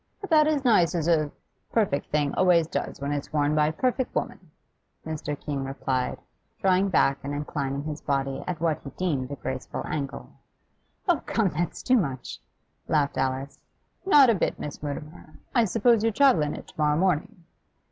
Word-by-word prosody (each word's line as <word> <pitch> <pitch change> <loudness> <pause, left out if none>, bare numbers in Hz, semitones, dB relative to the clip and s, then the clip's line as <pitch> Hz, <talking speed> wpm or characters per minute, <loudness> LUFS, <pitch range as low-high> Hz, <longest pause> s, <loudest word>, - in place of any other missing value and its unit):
'About 315 -5 +4
as 295 -3 0
nice 180 -7 +4
as 165 -2 -1
a 155 -3 +3 0.4
perfect 200 -11 +1
thing 145 -1 0
always 180 -3 +4
does 165 - -4
when 140 +1 -3
it's 145 0 -3
worn 150 -1 +1
by 150 0 +3
a - - 0
perfect 255 +8 -1
woman,' 240 -8 -4 0.6
Mr. 150 -2 -4
Keene 140 -2 -3
replied, 135 -1 -2 0.4
drawing 190 +1 +3
back 135 -6 +3
and 140 +1 -3
inclining 140 -1 -3
his 150 0 -5
body 135 -1 -1
at 175 -3 -3
what 165 -2 0
he 140 - -7
deemed 140 -7 -2
a 140 - -4
graceful 125 - -5
angle. 140 -2 -4 0.8
'Oh, 350 -4 +3
come, 220 -4 +2
that's 170 +2 -3
too 255 0 +4
much!' 135 - -3 0.5
laughed 145 -2 +1
Alice. 135 +1 -2 0.4
'Not 290 -10 +7
a - - +3
bit, 195 - -1
Miss 145 - -7
Mutimer. 150 +2 -7 0.2
I 235 -3 +4
suppose 220 +3 +3
you 225 - +3
travel 255 - +4
in 150 0 -1
it - - -10
tomorrow 150 -1 +1
morning? 185 +2 0
155 Hz, 175 wpm, -26 LUFS, 145-195 Hz, 0.8 s, Not